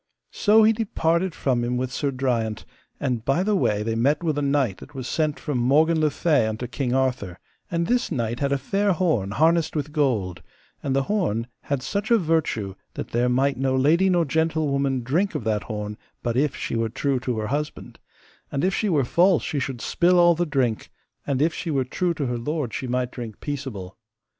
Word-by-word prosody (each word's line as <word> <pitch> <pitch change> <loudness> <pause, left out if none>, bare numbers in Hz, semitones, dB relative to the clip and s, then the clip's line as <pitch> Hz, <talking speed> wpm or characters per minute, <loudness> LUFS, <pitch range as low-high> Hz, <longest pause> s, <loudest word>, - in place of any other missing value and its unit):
So 220 +1 +4
he 220 +1 +5
departed 185 -5 0
from 125 -3 0
him 125 +1 -1
with 125 0 -2
Sir 145 - -1
Driant, 120 -5 -1 0.3
and 125 -5 -1
by 135 +9 +1
the 210 +1 +1
way 105 - +1
they 115 +1 -1
met 140 +8 +1
with 155 -3 0
a - - -1
knight 140 -8 +1
that 145 - -13
was 130 -2 -5
sent 155 -2 -1
from 145 -5 -2
Morgan 155 +6 +3
le 155 - +3
Fay 145 -5 +2
unto 110 +3 -3
King 125 +1 -3
Arthur; 125 -9 -1 0.3
and 170 0 0
this 245 +3 0
knight 120 -5 -2
had 140 -1 0
a 140 - +2
fair 200 +7 +1
horn 155 - +1
harnessed 160 +7 +2
with 150 -1 -2
gold, 110 - 0 0.4
and 135 -1 -1
the 135 - +2
horn 135 - 0 0.2
had 140 -3 -2
such 200 +6 -2
a 235 - +6
virtue 155 - 0 0.2
that - - -5
there 120 +1 +1
might 135 +2 +1
no 130 0 +1
lady 160 +8 +3
nor 175 -2 +3
gentlewoman 140 -4 0
drink 170 +11 0
of - - -2
that 105 -2 -1
horn 105 -1 -5 0.2
but 120 -1 -1
if 140 +2 +1
she - - -3
were 115 0 0
true 130 +2 -1
to 125 -2 -3
her 110 - -2
husband, 150 +3 -4 0.5
and 140 - -1
if 190 +1 +2
she 215 - 0
were 145 -7 +2
false 175 +6 +3
she 145 - -2
should 130 -3 -4
spill 180 +1 +2
all 175 0 +6
the 175 +1 -1
drink, 125 -7 0 0.4
and 140 0 +1
if 160 0 +1
she 170 - -5
were 135 -4 +1
true 170 +6 -1
to 145 - -2
her 120 -1 -2
lord 145 -2 -3
she 130 - -3
might 125 0 -1
drink 115 -4 -7
peaceable. 120 -10 -6
140 Hz, 210 wpm, -24 LUFS, 120-165 Hz, 0.5 s, a